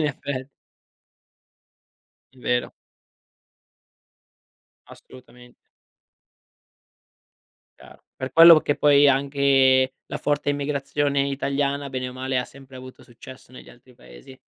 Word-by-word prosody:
in 155 - 0
effe 135 -1 -6 1.8
È 130 - -28
vero. 125 0 -2 2.1
Assolutamen 125 -1 -17 2.2
Chiaro. - - -18
Per 130 0 -7
quello 165 -1 +8
che 145 - -2
poi 145 -1 +4
è 145 - +6
anche 135 -1 +2
la 150 - -6
forte 145 0 -2
immigrazione 140 0 -2
italiana 140 +1 -3
bene 130 -1 -5
o - - -10
male 130 0 -3
ha 125 - -2
sempre 135 -1 -16
avuto 130 0 -13
successo 130 +2 -16
negli 130 - -14
altri 125 +1 -21
paesi. 90 - -16
135 Hz, 110 wpm, -22 LUFS, 130-140 Hz, 2.2 s, quello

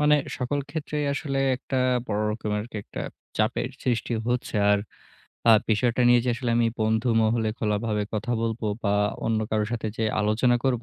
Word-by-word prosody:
মানে 150 0 +5 0.2
সকল 130 +3 -1
ক্ষেত্রেই 150 0 -3
আসলে 140 -2 -2 0.2
একটা 130 +1 -3 0.3
বড় 105 -1 -1
রকমের 105 -1 -2
আরকি 110 0 -9
একটা - - -7 0.4
চাপের - - +1
সৃষ্টি 120 -1 -1 0.2
হচ্ছে। 125 -2 -1 0.2
আর 105 - +3 0.7
আ - - +10 0.2
বিষয়টা 120 +3 +2
নিয়ে 120 0 +6
যে 125 - +2
আসলে 120 0 -2
আমি 120 0 +3
বন্ধুমহলে 110 0 +2
খোলাভাবে 105 0 0
কথা 115 +3 -1
বলব 115 0 -2 0.2
বা 100 0 +2 0.3
অন্য 110 -1 +1
কারো 110 -1 +1
সাথে 115 -2 -2
যে 110 - 0 0.2
আলোচনা 110 +4 +3
করব 125 -3 +1
115 Hz, 165 wpm, -25 LUFS, 110-125 Hz, 0.7 s, আ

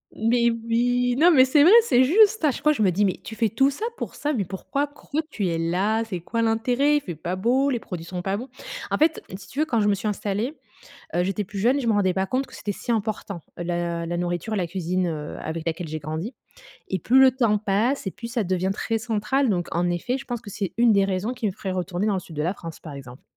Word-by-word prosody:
Mais 235 +1 +2
oui! 240 +2 +1
Non, 335 +3 +7
mais 260 -5 +7
c'est 285 +3 +4
vrai, 335 +6 +7
c'est 260 - +4
juste, 415 +8 +4
à 300 - +5
chaque 270 - -8
fois 300 0 +5
je 275 - -3
me 200 - +4
dis: 195 +4 +2
«Mais 190 - -1
tu 220 - -8
fais 225 0 +1
tout 270 +7 +3
ça 285 +11 -4
pour - - -6
ça? 295 +1 -1
Mais 220 -7 0
pourquoi, 195 +10 -3
pourquoi 290 +1 -4
tu 205 -9 -2
es 165 -1 -1
là? 190 +7 +1
C'est 205 -6 -5
quoi 230 +7 -2
l'intérêt? 245 +6 +2
Il 295 - +2
fait 180 - -6
pas 170 +4 -4
beau, 250 +8 +2
les 250 -4 0
produits 175 -6 -7
sont 180 0 -5
pas 195 +1 0
bons!» 245 +6 -6 0.4
en - - +2
fait, 315 +1 +2 0.2
si 200 - -13
tu 275 - -7
veux, 310 - +3
quand 235 -8 +1
je 205 - +2
me 205 - +4
suis 200 +2 -3
installée, 210 +6 -2 0.6
heu, 175 - +2
j'étais 195 +2 -1
plus 200 +1 -7
jeune, 250 +8 +3
je 240 - -1
me - - +4
rendais 195 -3 +2
pas 190 0 0
compte 260 +6 -1
que 260 - -16
c'était 210 - -5
si 220 +4 -3
important, 210 -4 -3 0.2
heu, 175 - -4
la 170 -1 -2
la 175 +1 -2
nourriture 175 +4 -2
et - - -1
la 180 -4 -1
cuisine, 180 0 -1
heu, 150 -2 -5
avec 160 +1 -5
laquelle 165 0 -3
j'ai 155 +1 -4
grandi 160 - -5 0.5
et 190 - -1
plus 245 +9 +4
le 265 0 +8
temps 235 -5 +2
passe 215 +4 0
et - - -2
plus 230 - -8
ça 235 -2 -1
devient 185 0 0
très 225 +2 -1
central 230 +4 0
donc, 175 -4 0
en 175 +1 +1
effet, 245 +9 -1
je 270 - -10
pense 240 -2 -4
que 205 - -10
c'est 200 -2 -4
une 235 -1 +5
des 200 -1 +4
raisons 195 +5 -2
qui 245 -3 -5
me 205 - +1
ferait 190 0 -5
retourner 185 +2 -2
dans 210 - +2
le - - 0
sud 165 -2 -12
de 150 - -1
la 175 +4 0
France, 165 -4 -9
par 155 - -9
exemple. 130 -2 -10
210 Hz, 275 wpm, -24 LUFS, 180-245 Hz, 0.6 s, le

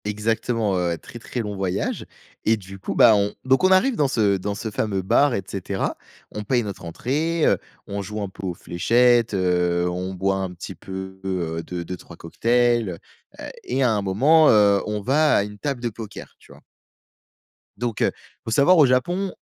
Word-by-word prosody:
Exactement, 110 0 -1
heu, 85 -1 -1
très, 120 - -12
très 120 +1 -4
long 105 -2 -5
voyage 95 0 -2 0.4
et 110 +1 +3
du 95 -1 -11
coup, - - -5
bah 115 - +7
on 100 0 0
donc 130 +5 +3
on 185 - +5
arrive 235 +8 +4
dans 145 - +2
ce 105 -6 +2
dans 100 +2 -4
ce 110 +1 -5
fameux 100 -2 -2
bar 135 +7 +3
et 95 - -2
cetera. 95 0 -3 0.4
On 105 - -5
paye 120 +3 +1
notre 100 -4 -7
entrée, 150 - -1
heu, - - +3 0.3
on 100 0 -4
joue 105 +2 -6
un - - -3
peu 95 0 -7
aux 90 - -3
fléchettes, 115 +7 +2
heu, 90 -1 +1
on 90 +2 -4
boit 95 +1 0
un 95 -1 -3
petit - - -8
peu, 95 0 -8
heu, 85 -4 -2
2-2-3 85 0 -7
cocktails, 120 +1 +1 0.4
heu - - -7 0.2
et 130 +2 -1
à 125 - +3
un 105 -2 0
moment, 140 +12 +4
heu, 100 -2 +5
on 105 0 -2
va 150 +7 +3
à - - +2
une 105 0 -9
table 135 -2 -3
de 120 - -1
poker, 110 -2 -10
tu - - -19
vois? - - -16 1.2
Donc 120 -1 -3
heu, - - +3 0.3
faut 115 - -4
savoir 155 +9 +5
au 155 - +7
Japon, 175 +10 0
105 Hz, 195 wpm, -23 LUFS, 95-120 Hz, 1.2 s, bah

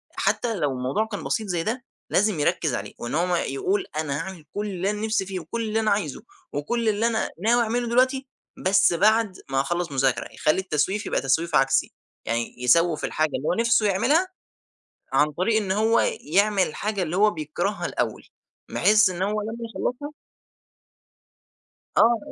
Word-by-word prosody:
حتى 235 -2 0
لو 150 -7 0
الموضوع 130 +11 -1
كان 205 -3 -6
بسيط 220 -2 -1
زي 175 -3 -1
ده، 245 +6 -3 0.3
لازم 205 -4 +2
يركِّز 155 -2 +1
عليه، - - -6
وإن 120 +4 -4
هو 175 +2 +1
يقول 390 - -1
أنا 145 -3 -1
هاعمل 180 -2 -7
كل 205 +1 -3
اللي 190 -1 -2
أنا 210 +1 -2
نفسي 220 -3 0
فيه 190 -1 -4
وكل 205 +8 -5
اللي 220 0 0
أنا 220 -1 +1
عايزه 200 -9 -2 0.3
وكل 220 +11 -1
اللي 215 +2 +1
أنا 225 -1 0
ناوي 240 +2 +4
أعمله 240 +2 -1
دلوقتي، 260 +3 +2 0.4
بس 190 -1 +4
بعد 215 +2 +2
ما 135 - +1
هاخلَّص 175 +4 -1
مذاكرة. 130 -3 0
يخلّي 155 +5 +1
التسويف 185 +4 -1
يبقى - - 0
تسويف 150 +5 +1
عكسي، 135 -2 +2 0.3
يعني 115 +1 -3
يسوِّف 160 +5 +3
الحاجة 155 0 0
اللي 150 - -5
هو - - +2
نفسه 230 +1 +2
يعملها، 255 - +2 0.9
عن 150 +1 +3
طريق 185 +8 +1
إن 190 - -3
هو 220 +3 +3 0.2
يعمل 200 +4 +2
الحاجة 205 +3 -2
اللي 170 0 -3
هو 210 +1 +5
بيكرهها 175 +5 -3
الأوّل، - - -2 0.5
بحيث 210 -1 +4
إن 180 0 -5
هو 210 +1 -1
لمّا 220 +2 -5 0.2
يخلصها 290 +4 -3 1.9
آه 235 0 +5
195 Hz, 170 wpm, -24 LUFS, 155-220 Hz, 1.9 s, هو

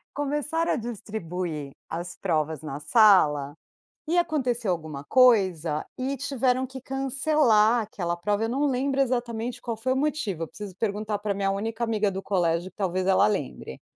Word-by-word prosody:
Começaram 295 +3 0
a - - +1
distribuir 185 - -5 0.2
as 175 +1 -5
provas 155 -4 -1
na 150 -2 -6
sala 150 - +4 0.5
e 345 +3 +1
aconteceu 250 - 0
alguma 155 -5 -4
coisa 185 - +3
e 265 +2 -2
tiveram 260 -1 0
que 265 +1 -9
cancelar 265 -4 +2
aquela 175 -5 -3
prova, 205 +5 -1
eu - - -2
não 275 +5 0
lembro 275 +1 +1
exatamente 240 -2 -2
qual 235 -2 -3
foi 230 +4 -2
o 260 - +1
motivo, 265 - -1
preciso 205 +1 -9
perguntar 210 0 -2
pra 205 0 -1
minha 195 0 0
única 225 +4 -3
amiga 215 -3 +1
do 190 0 -4
colégio 175 -1 0
que - - -63
talvez 185 -2 -1
ela 190 0 +4
lembre. 145 - -4
215 Hz, 160 wpm, -26 LUFS, 175-255 Hz, 0.5 s, sala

